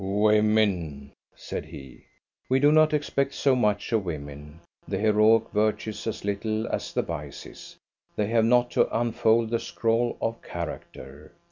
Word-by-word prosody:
"Women!" 100 -8 +1 0.2
said - - -6
he. 65 -2 -12 0.4
We 130 +1 +3
do 145 +2 +5
not 155 0 +5
expect 140 -2 -1
so 135 -2 +2
much 105 -4 0
of 110 -3 +1
women; 75 -1 -8 0.3
the 95 - -2
heroic 110 +2 +3
virtues 110 +1 -1
as 110 - -4
little 110 +2 -2
as - - -3
the - - -1
vices. 75 -4 -8 0.4
They 105 - 0
have 115 +1 +2
not 120 +1 +3
to - - +1
unfold 115 -1 +1
the 115 - +1
scroll 115 +1 -1
of 115 0 -3
character. 75 -3 -8
110 Hz, 145 wpm, -26 LUFS, 90-115 Hz, 0.4 s, do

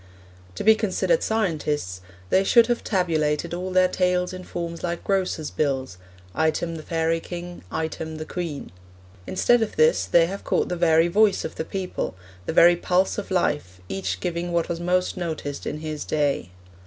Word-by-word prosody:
To - - -4
be 220 - +7
considered 220 - +1
scientists 150 - -1 0.3
they 190 - +4
should 235 +4 +6
have 240 0 -1
tabulated 165 -4 0
all 180 +2 -3
their 185 0 +4
tales 180 0 0
in 185 0 -7
forms 170 -2 -5
like 170 -1 -3
grocers' 185 -6 -1
bills 135 -9 -1 0.3
item 160 +1 0
the 160 - -6
fairy 165 0 0
king, 175 +1 -7
item 160 0 -4
the 155 - -5
queen. 165 -4 -5 0.6
Instead 240 +5 +3
of 220 - -2
this 470 +1 +4
they 170 -1 +5
have 195 +4 -6
caught - - 0
the 180 - -1
very 165 -1 +4
voice 205 +3 +3
of - - -5
the - - -4
people, 185 - -4 0.3
the - - 0
very 175 +2 +7
pulse 180 +3 +1
of 205 - -7
life, 145 - -1
each 95 -1 -3
giving 170 - -3
what 170 0 0
was 170 -1 -2
most 180 +2 0
noticed 160 -5 -4
in 150 - -4
his 155 -1 -4
day. 145 - 0
170 Hz, 175 wpm, -24 LUFS, 155-185 Hz, 0.6 s, be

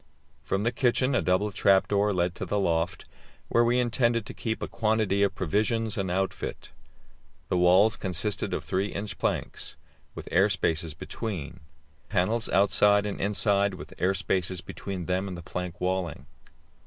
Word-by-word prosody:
From 95 +1 -1
the 115 - +1
kitchen 130 +2 +1
a 125 - +2
double 90 +5 +1
trap 100 -1 +3
door 105 0 +2
led 90 -2 0
to - - -6
the 105 - -1
loft, 85 -3 0 0.4
where 120 - +4
we 120 +1 +2
intended 120 -2 +1
to - - -8
keep 110 -2 -3
a - - -2
quantity 110 -3 +1
of 100 -2 +2
provisions 110 +5 0
and 95 -2 -2
outfit. 95 +2 -3 0.8
The 90 - +1
walls 95 +5 +5
consisted 95 +2 0
of - - -2
3 95 +2 -1
inch 105 0 -6
planks, - - -3 0.4
with - - -8
air 95 +4 +4
space 80 -5 -1
between; 95 -1 -5 0.5
panels 110 +5 +1
outside 100 +1 +4
and 105 - -4
inside, 100 -1 +1
with - - -10
air 95 +2 +2
space 95 -1 -1
between 90 0 -6
them 90 +2 -1
and 90 -2 -6
the 85 - -9
plank 90 0 -5
walling. 90 -7 -2
100 Hz, 165 wpm, -27 LUFS, 90-105 Hz, 0.8 s, walls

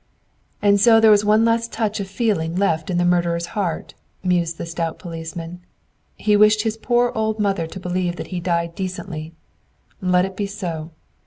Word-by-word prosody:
"And 200 -1 +4
so 225 0 +7
there 220 -1 +6
was 210 0 +5
one 215 +2 +4
last 230 0 +1
touch 220 -1 -1
of 195 - -3
feeling 190 -6 -1
left 165 -4 0
in 180 - 0
the 175 - +2
murderer's 170 -1 +1
heart," 185 -6 -3 0.3
mused 175 -3 0
the - - -5
stout 165 -1 -3
policeman. 165 +1 -7 0.6
"He 210 -1 +2
wished 215 +1 +5
his 220 -1 -1
poor 240 +2 +1
old 220 0 -1
mother 195 -6 0
to 190 - -8
believe 180 -1 -2
that - - -7
he 180 - -1
died 170 -1 -1
decently. 165 -4 -6 0.7
Let 180 -1 +3
it 190 0 -7
be 205 0 -2
so! 170 -6 -5
185 Hz, 180 wpm, -21 LUFS, 170-210 Hz, 0.7 s, so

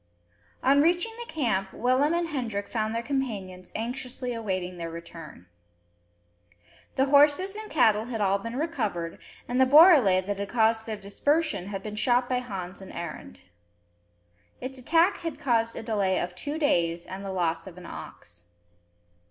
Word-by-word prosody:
On 280 +2 +5
reaching 350 +7 +2
the 475 - -7
camp, 195 -11 -1
Willem 260 +6 +2
and 340 -1 -1
Hendrik 225 -9 -3
found 220 -1 -2
their 230 - -2
companions 205 -10 -4
anxiously 250 +2 -4
awaiting 185 -5 -3
their 165 0 -4
return. 165 - -10 1.5
The 265 - +3
horses 295 +8 +4
and 430 0 -7
cattle 220 -7 +3
had 235 -2 -4
all 200 -1 +2
been 230 +4 -6
recovered, 220 - -2 0.3
and 250 +1 +1
the 260 - +5
borele 275 - +7
that 205 0 -2
had 200 -1 -3
caused 225 -1 +2
their 220 -1 -3
dispersion 285 - 0
had 195 -1 -5
been 210 -1 -6
shot 245 +2 +2
by 250 0 0
Hans 195 -6 -6
and 190 - -10
Arend. 160 - -7 1.2
Its 260 +1 -6
attack 330 +8 +3
had 330 -2 -5
caused 230 -3 +1
a - - -6
delay 200 -4 0
of 180 +1 -3
two 290 +12 -5
days, 170 - +1
and 190 +1 -7
the 195 - -4
loss 170 -2 -1
of 180 -2 -11
an 180 - -10
ox. 85 - -11
225 Hz, 160 wpm, -27 LUFS, 190-275 Hz, 1.5 s, borele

